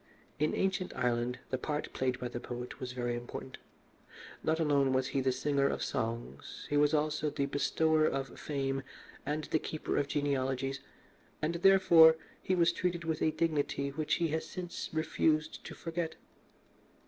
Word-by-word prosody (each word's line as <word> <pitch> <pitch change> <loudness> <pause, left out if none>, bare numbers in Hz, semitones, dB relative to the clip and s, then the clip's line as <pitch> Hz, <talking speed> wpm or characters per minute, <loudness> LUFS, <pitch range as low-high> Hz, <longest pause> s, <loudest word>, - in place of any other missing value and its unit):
In 150 +1 +1
ancient 190 -1 0
Ireland 125 0 0
the 130 - 0
part 150 +2 -3
played 130 -1 -1
by 125 - -3
the 120 0 -5
poet 125 0 -7
was 125 -1 -4
very 120 -1 -2
important. 120 +2 -7 0.8
Not 160 +1 +1
alone 140 -4 +3
was 130 0 +1
he 135 - 0
the 130 0 +2
singer 140 +1 +1
of - - -1
songs, 115 - -4
he - - +2
was 145 +1 +4
also 155 0 0
the 140 -1 -1
bestower 155 +2 +2
of 135 0 -3
fame 135 -2 -2 0.5
and 150 +1 -1
the 155 - 0
keeper 155 - -3
of 145 - +1
genealogies, 135 -2 -1 0.6
and, 155 +2 0
therefore, 170 -3 +7 0.3
he 185 - +1
was 170 -1 +4
treated 175 -1 -1
with 160 -1 -2
a - - +4
dignity 145 -4 0
which 150 +2 0
he 170 -2 0
has 160 +1 -1
since 180 -2 -5
refused 155 0 0
to - - -7
forget. 165 -1 -3
145 Hz, 165 wpm, -32 LUFS, 130-160 Hz, 0.8 s, therefore